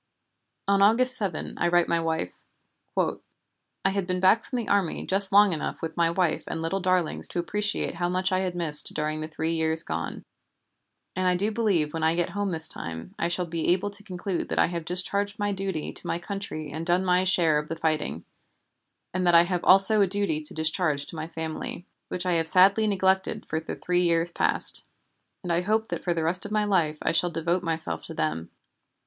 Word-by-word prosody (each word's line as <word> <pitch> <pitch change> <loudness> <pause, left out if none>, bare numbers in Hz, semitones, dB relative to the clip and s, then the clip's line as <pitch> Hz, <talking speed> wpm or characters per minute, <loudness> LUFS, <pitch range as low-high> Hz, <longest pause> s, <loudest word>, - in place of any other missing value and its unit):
On 200 0 +3
August 250 +5 +4
7 195 -7 -3
I - - +1
write 175 0 +3
my 170 - +1
wife: 160 - -2 0.6
"I - - -4
had 195 -2 -2
been 180 0 -1
back 190 +5 +4
from 255 - -5
the 235 - -3
army 200 -4 0
just 195 +1 +1
long 205 -1 +5
enough 155 - -5
with 165 - -4
my 170 -1 +2
wife 170 -2 0
and 165 - -4
little 165 +4 -2
darlings 185 -3 0
to - - -7
appreciate 205 +4 -1
how 175 +1 -2
much 185 +1 0
I 185 - +2
had 185 -2 -2
missed 160 -4 +4
during 155 0 -2
the 155 - -4
three 160 +1 -3
years 160 0 +1
gone, 80 +1 -5 0.9
and 185 0 0
I 180 - +3
do 205 +4 0
believe 195 -10 0
when 165 - -3
I 160 +1 +2
get 175 0 -1
home 205 0 -2
this 160 -2 +4
time 80 - -6
I 170 - +1
shall 175 +1 +1
be 165 -1 -3
able 200 +3 -2
to 200 0 -8
conclude 185 -2 -4
that - - -3
I - - +5
have 170 -1 -5
discharged 200 +3 -1
my 205 -1 -1
duty 190 -5 -4
to - - -7
my - - -1
country 175 -5 -6
and 160 +3 -5
done 175 +2 +1
my 180 0 +3
share 170 -5 +3
of 150 - -8
the 165 - -3
fighting, 160 -2 -2 0.9
and 185 0 -1
that 175 - +5
I 170 - +8
have 175 0 -2
also 195 +3 +6
a 200 - +4
duty 190 -5 -1
to 150 - -2
discharge 155 -2 0
to - - -9
my 155 0 -5
family, 160 +2 -6 0.2
which 180 0 -3
I 180 - +1
have 165 -1 +1
sadly 195 +6 +5
neglected 190 +1 0
for 160 - -2
the 160 - -6
three 180 0 0
years 170 -1 +1
past; - - +1 0.6
and 175 -2 -1
I 170 - +1
hope 220 +4 0
that - - -4
for 175 -2 0
the 165 - -1
rest 175 +3 -1
of 205 - -6
my 215 0 +1
life 170 -7 +1
I - - +1
shall 175 +2 +2
devote 170 +2 -1
myself 165 -2 0
to - - -8
them. 80 +2 -2
175 Hz, 215 wpm, -26 LUFS, 160-195 Hz, 0.9 s, I